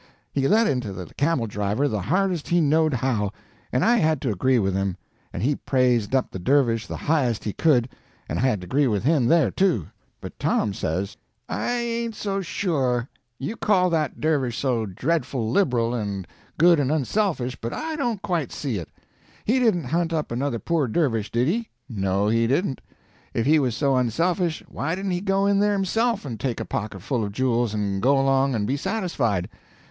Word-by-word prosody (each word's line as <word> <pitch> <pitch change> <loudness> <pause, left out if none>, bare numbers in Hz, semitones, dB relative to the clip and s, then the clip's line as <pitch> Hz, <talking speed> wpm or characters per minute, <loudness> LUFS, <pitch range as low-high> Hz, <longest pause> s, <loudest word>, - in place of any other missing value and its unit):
He 135 -1 +1
let 225 +6 +4
into 125 - -1
the 90 -3 -8
camel 145 -4 +1
driver 105 +6 -1
the 105 -7 -2
hardest 180 - 0
he 175 - +3
knowed 155 -1 +3
how, 110 -5 0 0.4
and 125 - +2
I 240 +2 +5
had 155 - +2
to 125 - 0
agree 130 +7 +2
with 95 -4 +1
him; 95 -1 -1 0.3
and - - -4
he 140 +4 +2
praised 125 -3 +1
up 130 - +1
the 95 - -6
dervish 115 0 +2
the - - -5
highest 135 -8 0
he 105 - -3
could, 130 -7 +3 0.4
and 80 - -2
I - - 0
had 125 -7 +1
to - - -7
agree 140 +9 +2
with 105 -4 0
him 140 -3 +3
there, 160 - +4
too. 180 - +1 0.3
But - - -10
Tom 100 - +1
says: 95 +3 -3 0.3
"I 245 - -2
ain't 235 -1 -2
so 195 -2 -2
sure. 135 - -1 0.3
You 140 - -4
call 185 -5 +2
that 155 -4 -1
dervish 140 -7 0
so 120 -5 0
dreadful 130 - -1
liberal 120 -9 +2
and 100 -5 -3 0.3
good 170 0 +6
and 140 -1 +1
unselfish, 155 - 0
but 115 - -3
I 315 0 -3
don't 240 -9 -2
quite 170 -7 -1
see 130 -7 -3
it. 85 - -8 0.6
He 250 +5 +3
didn't 215 -9 +2
hunt 165 +6 0
up 155 -5 -2
another 125 +1 -1
poor 160 +2 0
dervish, 115 -5 0
did 120 +2 +1
he? 225 +7 -1 0.2
No, 100 -2 0
he 115 +1 +2
didn't. 135 +2 0 0.5
If 115 - +1
he 155 +3 +5
was 125 -5 0
so 140 +1 +2
unselfish, 165 - 0
why 160 +4 -2
didn't 195 0 -3
he 180 0 -1
go 195 0 +1
in 200 0 +3
there 205 0 +3
himself 210 +2 0
and 115 -6 -5
take 120 0 -2
a - - -3
pocketful 110 +3 -3
of 100 - -3
jewels 120 -2 +1
and 100 -2 -1
go 135 +4 +4
along 135 -1 +2
and 105 -2 0
be 135 +6 0
satisfied? 135 - -1
135 Hz, 195 wpm, -24 LUFS, 115-170 Hz, 0.6 s, good